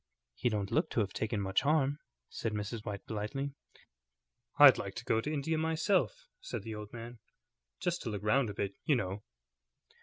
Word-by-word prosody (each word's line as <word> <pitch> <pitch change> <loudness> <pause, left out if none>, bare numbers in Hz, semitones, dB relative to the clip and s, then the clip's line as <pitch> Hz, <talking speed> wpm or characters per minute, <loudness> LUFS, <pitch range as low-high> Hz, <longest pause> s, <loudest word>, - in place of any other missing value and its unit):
"He 120 - 0
don't 105 -3 -2
look 155 - +2
to - - 0
have 100 -2 -2
taken 110 -1 -1
much 95 -1 +1
harm," 145 -1 +2 0.3
said 110 - -3
Mrs. 105 +1 -3
White, 100 -2 -5
politely. 115 +7 -3 1.0
"I'd - - +9
like - - -5
to - - -6
go 110 - +2
to 150 - -3
India 155 +2 0
myself," 160 - +1
said - - -5
the 110 0 -5
old 105 -1 -7
man, 120 0 -8 0.6
"just 175 0 -1
to 120 - -3
look 105 -1 -4
round 120 +3 +3
a 100 - -6
bit, 100 -1 -2
you 150 - +3
know." 100 -3 -2
115 Hz, 185 wpm, -33 LUFS, 105-140 Hz, 1.0 s, I'd